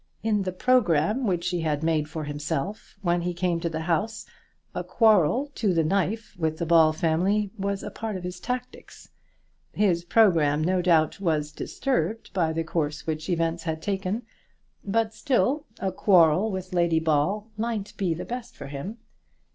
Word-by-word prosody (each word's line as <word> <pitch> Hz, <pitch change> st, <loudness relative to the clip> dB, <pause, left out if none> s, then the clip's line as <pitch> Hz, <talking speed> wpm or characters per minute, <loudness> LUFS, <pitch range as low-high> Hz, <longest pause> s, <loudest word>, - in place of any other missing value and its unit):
In 215 Hz, -2 st, +1 dB
the 185 Hz, -1 st, -2 dB
programme 210 Hz, -, +2 dB
which 175 Hz, -1 st, 0 dB
he 175 Hz, -2 st, -1 dB
had 155 Hz, -1 st, -1 dB
made 155 Hz, -2 st, +1 dB
for 155 Hz, 0 st, -5 dB
himself 150 Hz, +6 st, -4 dB
when 175 Hz, -1 st, +1 dB
he 175 Hz, 0 st, -2 dB
came 175 Hz, -1 st, 0 dB
to 170 Hz, -, -2 dB
the 160 Hz, 0 st, -4 dB
house, 205 Hz, +7 st, -1 dB, 0.5 s
a -, -, -3 dB
quarrel 225 Hz, -, +3 dB
to 205 Hz, -8 st, 0 dB
the 165 Hz, -, +3 dB
knife 200 Hz, +6 st, -1 dB
with 160 Hz, -1 st, 0 dB
the 170 Hz, -, -2 dB
Ball 165 Hz, -1 st, +5 dB
family 185 Hz, +5 st, +1 dB
was 200 Hz, -1 st, -2 dB
a -, -, -5 dB
part 220 Hz, -2 st, -4 dB
of 180 Hz, -, -8 dB
his 180 Hz, 0 st, -5 dB
tactics. 250 Hz, +4 st, -6 dB, 0.6 s
His 180 Hz, -5 st, +2 dB
programme, 165 Hz, -7 st, +3 dB
no 180 Hz, +2 st, +2 dB
doubt, 165 Hz, -3 st, +3 dB
was 155 Hz, -4 st, 0 dB
disturbed 230 Hz, -, -2 dB
by 170 Hz, -4 st, +1 dB
the 165 Hz, +1 st, -1 dB
course 155 Hz, -2 st, -2 dB
which 155 Hz, +1 st, -3 dB
events 165 Hz, -1 st, 0 dB
had 160 Hz, -1 st, -3 dB
taken, 195 Hz, +5 st, -2 dB, 0.6 s
but 220 Hz, +2 st, 0 dB
still 280 Hz, +3 st, +1 dB
a 190 Hz, 0 st, -1 dB
quarrel 185 Hz, +1 st, +4 dB
with 185 Hz, -2 st, -5 dB
Lady 170 Hz, -2 st, +3 dB
Ball 160 Hz, +7 st, +1 dB
might 215 Hz, -2 st, -3 dB
be 180 Hz, -5 st, 0 dB
the 170 Hz, -, -6 dB
best 245 Hz, 0 st, -6 dB
for -, -, -8 dB
him. 145 Hz, -, -6 dB
180 Hz, 170 wpm, -26 LUFS, 160-210 Hz, 0.6 s, Ball